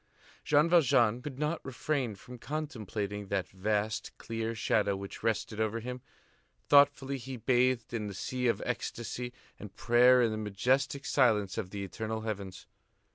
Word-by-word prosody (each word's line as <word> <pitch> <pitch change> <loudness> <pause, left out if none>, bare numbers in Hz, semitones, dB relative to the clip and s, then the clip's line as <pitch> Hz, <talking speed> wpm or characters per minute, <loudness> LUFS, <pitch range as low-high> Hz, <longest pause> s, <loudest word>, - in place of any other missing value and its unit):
Jean 150 +2 +4
Valjean 125 -9 +4
could 140 -2 -7
not 150 +3 -2
refrain 130 -3 -2
from 125 +5 -12
contemplating 110 - -4
that 95 -2 -1
vast, 105 +3 -2
clear 115 0 -4
shadow 105 -2 +1
which 100 0 -8
rested 110 -1 -1
over 110 +1 0
him; 125 +2 -6 0.7
thoughtfully 140 -1 +4
he 130 +1 -7
bathed 125 0 +1
in 110 -3 -2
the 100 - -6
sea 125 +6 -2
of 115 -4 0
ecstasy 120 +1 -4 0.3
and 105 -2 -10
prayer 125 +1 +5
in 115 - +2
the 110 - -3
majestic 130 - 0
silence 110 -10 +2
of 95 - -3
the 100 0 -5
eternal 110 +4 -4
heavens. 100 -4 -5
115 Hz, 150 wpm, -31 LUFS, 105-130 Hz, 0.7 s, prayer